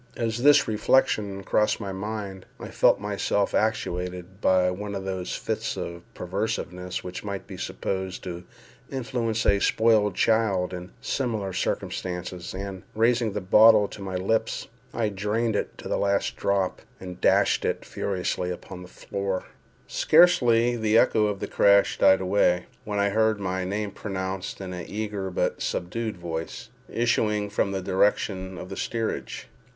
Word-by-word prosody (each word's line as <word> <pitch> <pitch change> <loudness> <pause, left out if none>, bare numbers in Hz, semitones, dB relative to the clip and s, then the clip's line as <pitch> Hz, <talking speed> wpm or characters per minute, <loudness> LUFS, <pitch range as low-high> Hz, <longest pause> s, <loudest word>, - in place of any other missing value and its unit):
As 115 0 -1
this 145 +2 +6
reflection 105 -3 +1
crossed 105 +3 +1
my 100 -3 -4
mind, 100 -1 -5
I - - -7
felt - - +3
myself 100 0 0
actuated 90 -3 -2
by 90 -1 +3
one 100 +2 -5
of 95 0 -5
those 95 -2 -3
fits - - -3
of 85 0 -5
perverseness 90 -1 -3
which 90 0 -6
might 100 -2 -5
be - - -9
supposed 95 -1 -4
to 90 -1 -6 0.5
influence 120 -4 -2
a 100 - +4
spoiled 110 -2 +3
child 100 -5 +2
in 90 0 -6
similar 110 -8 -2
circumstances, 90 0 -3
and, 95 -1 -5
raising 115 -1 +2
the 105 - -2
bottle 105 +2 +6
to 100 - -10
my 95 -1 -4
lips, 100 +5 -1 0.2
I 115 -2 0
drained 105 +3 -1
it - - -3
to - - -8
the - - -1
last 100 0 +1
drop, 100 -2 0 0.2
and 90 -1 -9
dashed - - +3
it - - -2
furiously 90 -2 -2
upon 90 +1 -7
the 90 - -10
floor. 95 0 -4 0.4
Scarcely 125 -9 +4
had 120 -2 -4
the 110 0 +3
echo 110 -2 +4
of 100 -2 -3
the - - -3
crash 100 0 +4
died 95 0 +6
away, 90 -2 +2 0.2
when 105 -1 -3
I 100 0 +2
heard 110 0 +2
my 95 -1 -2
name 100 +2 -2
pronounced 95 -2 -4
in 95 -1 -5
an 90 -1 -6
eager 105 -2 -3
but 90 - -1
subdued 110 +4 -3
voice, 80 -2 -5 0.2
issuing 105 -3 +1
from 100 -1 0
the 95 -1 -3
direction 95 -1 0
of 90 - -8
the 95 - -6
steerage. 115 -1 -3
100 Hz, 155 wpm, -26 LUFS, 95-110 Hz, 0.5 s, this